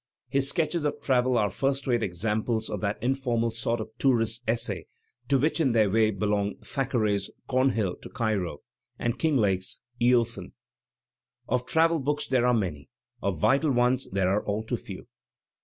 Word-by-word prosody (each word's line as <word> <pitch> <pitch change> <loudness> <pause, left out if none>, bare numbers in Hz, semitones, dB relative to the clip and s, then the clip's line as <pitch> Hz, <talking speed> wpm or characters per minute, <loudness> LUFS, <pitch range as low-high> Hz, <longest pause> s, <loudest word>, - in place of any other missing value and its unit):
His 135 0 +2
sketches 165 0 0
of 150 - -1
travel 125 -2 +2
are 105 -3 +1
first 135 0 -1
rate 120 -3 +1
examples 110 +4 -1
of - - -3
that 105 -1 -1
informal 120 -3 0
sort 115 +1 -1
of 110 - -6
tourists' 115 -3 +2
essay 115 +1 -1 0.4
to 140 - +4
which 155 +6 +1
in 135 -6 +2
their 110 -4 +3
way 110 0 +3
bdiong 105 0 -1
Thackeray's 110 -8 0 0.2
"Cornhill 125 -7 +1
to - - -11
Cairo" 105 - -2 0.4
and 120 +1 -2
Kinglake's 105 - +1 0.2
"Eothen." 120 -5 +2 0.9
Of 125 +1 -1
travel 165 +2 +3
books 145 +2 -1
there 125 -2 +2
are 125 - +4
many; 80 - -3 0.3
of 100 -4 -1
vital 140 - +3
ones 125 0 +2
there 95 -1 +1
are 100 +2 +1
all 105 +1 -2
too 110 - -2
few. - - -9
120 Hz, 160 wpm, -27 LUFS, 105-135 Hz, 0.9 s, to